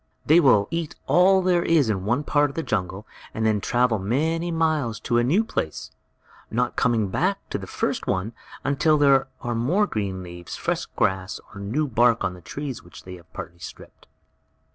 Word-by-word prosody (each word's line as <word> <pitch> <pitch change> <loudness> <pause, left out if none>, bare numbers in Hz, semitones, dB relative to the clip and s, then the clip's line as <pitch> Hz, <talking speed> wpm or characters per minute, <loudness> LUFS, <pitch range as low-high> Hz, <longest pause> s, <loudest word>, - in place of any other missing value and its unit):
They 160 +3 +6
will 115 -10 +4
eat 165 -2 -3
all 190 +1 +4
there 180 -1 +3
is 160 -6 +3
in 95 -3 -1
one 120 +7 +1
part 145 0 +2
of 140 - -11
the 165 - -2
jungle, 95 -2 -3 0.3
and 110 - -1
then 105 -2 +2
travel 120 -2 +1
many 160 - 0
miles 155 -9 0
to 120 -1 +1
a - - +2
new 170 - +3
place, 80 - -4 0.6
not 125 +2 -1
coming 115 -5 +1
back 185 - +1
to - - -2
the - - -8
first - - -2
one 95 +5 -1 0.3
until 145 +3 +2
there 140 -2 +4
are 120 - -2
more 145 - +2
green 100 - -3
leaves, 85 -1 -8
fresh - - -2
grass, 95 +1 -1
or 100 - -8
new 120 +10 -1
bark 120 -1 +3
on 90 - -1
the 90 - -13
trees 140 - -6
which 90 - -14
they 90 - -9
have 85 - -20
partly 85 0 -8
stripped. - - -12
120 Hz, 190 wpm, -24 LUFS, 100-155 Hz, 0.6 s, They